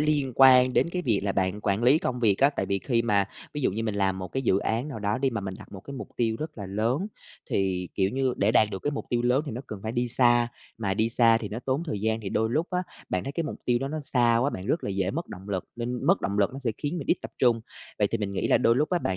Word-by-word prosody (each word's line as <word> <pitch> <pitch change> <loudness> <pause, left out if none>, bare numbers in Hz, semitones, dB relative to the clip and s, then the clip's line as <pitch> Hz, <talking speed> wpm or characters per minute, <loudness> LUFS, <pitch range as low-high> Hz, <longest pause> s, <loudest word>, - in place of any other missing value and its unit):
liên 150 -3 +1
quan 130 -1 +7
đến - - +3
cái 180 - -2
việc 115 - +1
là 100 - 0
bạn 95 +2 -1
quản 100 +2 0
lý 130 +6 +5
công 125 -5 -2
việc 105 -4 +3
á. 140 +1 +5
Tại 145 - -3
vì 100 0 0
khi 115 +1 0
mà 100 -4 +2 0.3
ví 150 - -2
dụ - - +2
như 110 +3 -2
mình 110 -2 -2
làm 95 -2 0
một 95 -1 -5
cái 135 - -3
dự 95 -6 +3
án 115 +7 -1
nào 135 -7 -6
đó 105 0 -1
đi, 135 0 +1
mà 115 -3 -3
mình 95 -1 -5
đặt - - -13
một 95 - -8
cái 140 +8 -9
mục 135 - -7
tiêu 115 -2 +1
rất 155 -4 -6
là 100 - -5
lớn, 115 - 0 0.4
thì, 95 -2 0
kiểu 95 0 +1
như, 130 -1 0
để 100 +2 +2
đạt 110 -3 +5
được 95 -2 -6
cái 145 - 0
mục 145 - -5
tiêu 120 -1 +1
lớn 125 +4 +2
thì 140 - -4
nó 120 - -4
cần 105 - -7
phải 110 - -3
đi 120 0 0
xa. 120 -1 +3 0.3
Mà 100 -4 -1
đi 110 +2 +2
xa 115 -1 +4
thì 105 -3 -5
nó 110 - -5
tốn 135 +4 0
thời 105 -8 -3
gian, 110 +1 0
thì 100 - -5
đôi 110 +3 0
lúc 155 +7 0
á, 180 -1 0 0.3
bạn 90 0 -1
thấy 140 - -4
cái 165 +3 -2
mục - - -5
tiêu 120 -1 +2
đó 135 +2 -3
nó 155 +2 -3
xa 120 -4 +2
quá, 130 +5 +2
bạn 95 -6 -6
rất 160 - 0
là - - -2
dễ 95 -1 0
mất 170 +5 -4
động 95 +3 -10
lực, 95 -3 -2
nên 120 +1 -3
mất 190 +3 +4
động 100 +1 -2
lực 100 +2 +2
nó 135 - -6
sẽ 125 -5 -1
khiến 155 +4 -2
mình 140 - -6
ít - - +3
tập - - -7
trung. 120 -3 +3 0.4
Vậy 105 - +3
thì 115 - 0
mình 100 -2 -3
nghĩ 100 - -1
là - - +5
đôi 115 +1 +3
lúc 150 +3 +1
á, 180 - +2
bạn 95 - -2
115 Hz, 320 wpm, -27 LUFS, 100-135 Hz, 0.4 s, quan